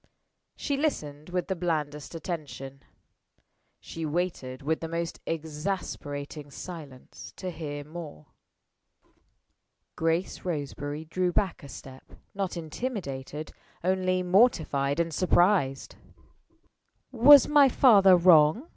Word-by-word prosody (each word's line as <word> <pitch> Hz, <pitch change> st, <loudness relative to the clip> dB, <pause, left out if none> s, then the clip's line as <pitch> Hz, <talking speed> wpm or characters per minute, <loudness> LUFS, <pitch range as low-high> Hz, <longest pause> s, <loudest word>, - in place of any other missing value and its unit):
She 285 Hz, -2 st, -2 dB
listened 155 Hz, -, -3 dB
with 180 Hz, 0 st, -2 dB
the 190 Hz, -, -1 dB
blandest 155 Hz, -3 st, -3 dB
attention. 145 Hz, -5 st, -6 dB, 1.0 s
She 165 Hz, -, -8 dB
waited 150 Hz, -5 st, -3 dB
with 160 Hz, +3 st, 0 dB
the 165 Hz, -, -5 dB
most 165 Hz, 0 st, -4 dB
exasperating 150 Hz, -3 st, -5 dB
silence 145 Hz, -5 st, -10 dB
to 185 Hz, -1 st, -5 dB
hear 145 Hz, -3 st, -6 dB
more. 155 Hz, -, -9 dB, 1.7 s
Grace 165 Hz, +3 st, -1 dB
Roseberry 145 Hz, -2 st, -4 dB
drew 180 Hz, +2 st, -1 dB
back 190 Hz, 0 st, -1 dB
a 140 Hz, -, -11 dB
step 130 Hz, -1 st, -12 dB, 0.2 s
not 195 Hz, -3 st, -3 dB
intimidated 155 Hz, -, -5 dB, 0.3 s
only 185 Hz, 0 st, +1 dB
mortified 170 Hz, -, +2 dB
and 165 Hz, -1 st, -1 dB
surprised. 175 Hz, -5 st, +1 dB, 1.1 s
"Was 270 Hz, +3 st, +8 dB
my 290 Hz, -2 st, +6 dB
father 200 Hz, -8 st, +6 dB
wrong?" 175 Hz, -, +5 dB
165 Hz, 100 wpm, -27 LUFS, 145-185 Hz, 1.7 s, Was